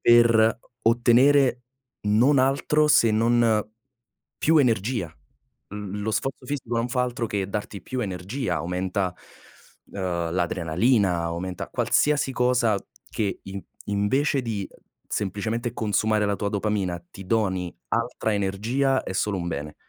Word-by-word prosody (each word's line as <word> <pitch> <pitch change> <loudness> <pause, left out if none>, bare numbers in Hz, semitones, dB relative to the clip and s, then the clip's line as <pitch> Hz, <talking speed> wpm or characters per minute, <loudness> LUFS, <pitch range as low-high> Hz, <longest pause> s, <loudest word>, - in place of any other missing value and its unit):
per 115 -1 +5 0.2
o 115 - +5
ottenere 125 +2 +4 0.4
non 115 +7 +4
altro 140 +3 +2
se 115 -6 +5
non 115 -1 +2 0.7
più 160 +1 +3
energia. 115 - 0 0.6
L 105 -1 -5
lo 110 - -1
sforzo 130 +3 -3
fisico 125 -4 -3
non 115 +1 0
fa 125 +1 0
altro 125 -1 -2
che 100 -2 -2
darti 100 -1 -4
più 130 +5 -4
energia, 95 - -3
aumenta, 90 +3 -2 0.8
uhm, 85 -4 -2
l'adrenalina, 90 +2 +1
aumenta 85 +2 -4
qualsiasi 145 -2 +1
cosa 125 -4 +2 0.3
che 100 -3 -2
in 95 0 -7 0.2
invece 130 +8 +1
di, 105 -5 -3 0.4
semplicemente 110 +4 -2
consumare 105 0 +1
la 100 - +1
tua 100 - -2
dopamina, 100 -4 -1
ti 95 - -10
doni 95 -5 0 0.2
altra 115 -1 -1
energia, 115 +8 0
è - - -4
solo 100 +1 0
un 85 - -4
bene. 75 -2 -5
110 Hz, 130 wpm, -25 LUFS, 95-120 Hz, 0.8 s, per